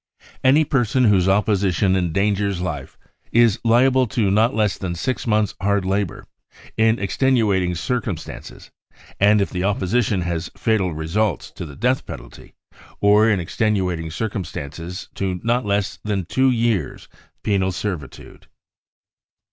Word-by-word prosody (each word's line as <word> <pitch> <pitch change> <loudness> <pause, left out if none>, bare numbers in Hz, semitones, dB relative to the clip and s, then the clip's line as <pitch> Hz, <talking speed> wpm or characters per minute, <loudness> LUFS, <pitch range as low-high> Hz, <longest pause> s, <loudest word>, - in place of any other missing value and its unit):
* - - -24
" - - -32
Any 155 +3 +4
person 125 -2 +1
whose 95 -5 +4
opposition 100 -2 +2
endangers 95 +2 0
life 80 -7 -5 0.3
is 115 -2 +4
liable 125 +2 +4
to 105 -2 0
not 110 +2 +3
less 105 -3 +1
than 90 -3 -3
six 130 +9 -3
''months 105 -2 +1
hard 100 -1 +1
labour, 95 -1 -2 0.5
in 110 +1 +3
extenuating 100 -5 +1
circumstances, 110 -3 -5 0.5
and 105 +1 +5
if 100 - -1
the 90 -1 -2
opposition 100 +1 0
has 85 -1 -3
fatal 105 -5 +1
results, 80 +5 -2
to 85 - -7
the 70 - -11
death 125 - 0
penalty, - - -11 0.4
or 105 +2 +5
in 105 -4 +2
extenuating 90 -3 -1
circumstances 85 -2 -5
to 95 -2 -2
not 120 0 0
less 100 -1 -1
than 100 -4 -2
two 130 +9 +2
years 115 -5 -1 0.4
penal 95 -2 +1
servitude. 90 -6 -6
100 Hz, 135 wpm, -21 LUFS, 90-110 Hz, 0.5 s, and